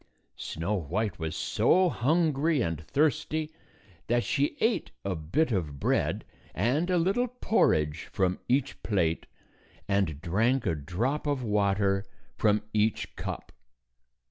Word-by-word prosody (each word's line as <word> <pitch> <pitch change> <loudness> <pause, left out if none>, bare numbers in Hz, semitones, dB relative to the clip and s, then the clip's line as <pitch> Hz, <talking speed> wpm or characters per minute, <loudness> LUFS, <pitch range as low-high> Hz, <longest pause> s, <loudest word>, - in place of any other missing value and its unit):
Snow 85 +6 -3
White 95 +2 -2
was 80 -1 -3
so 185 +1 +3
hungry 155 +2 +2
and 80 -2 -2
thirsty 155 +1 0 0.6
that 120 +1 +2
she 145 0 0
ate 225 +1 +1 0.2
a 95 -2 -1
bit 85 - 0
of 80 -9 -2
bread - - 0 0.3
and 130 - +1
a 180 - +3
little 195 +9 +2
porridge 80 - +1
from 95 -1 0
each 130 +2 +1
plate, 85 -6 0 0.6
and 100 -7 +1
drank 115 - +1
a 85 - +2
drop 110 - -2
of 140 -3 0
water 100 -2 +1 0.3
from 105 -1 +2
each 110 0 0
cup. - - -6
110 Hz, 125 wpm, -28 LUFS, 90-150 Hz, 0.6 s, so